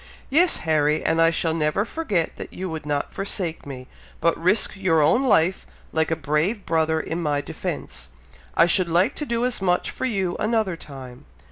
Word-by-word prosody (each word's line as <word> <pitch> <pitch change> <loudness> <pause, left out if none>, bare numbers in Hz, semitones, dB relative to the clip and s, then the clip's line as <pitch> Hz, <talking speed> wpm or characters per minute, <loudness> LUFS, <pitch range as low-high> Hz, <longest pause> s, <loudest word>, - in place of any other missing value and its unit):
"Yes, 340 +5 +4
Harry! 155 -1 +2
and 165 0 +2
I 165 - +6
shall 165 -1 0
never 160 +5 0
forget 210 - -2
that - - -8
you 185 - -5
would 155 -2 -6
not 145 -1 -2
forsake 180 -6 -2
me, 130 -2 -8 0.3
but 170 - +2
risked 185 +7 +2
your 185 -4 +2
own 155 - +4
life, 190 -8 +2 0.3
like 160 -1 +1
a 160 - +1
brave 160 +8 -1
brother, 160 -1 +1
in 165 +2 -4
my 145 -3 0
defence. 60 - -6 0.5
I 170 - +7
should 175 0 +1
like 180 - +3
to 295 - -3
do 235 +1 0
as 250 -5 -2
much 180 -2 +1
for - - -4
you 195 -7 -1
another 215 -4 0
time!" 135 -6 -11
165 Hz, 190 wpm, -23 LUFS, 155-200 Hz, 0.5 s, I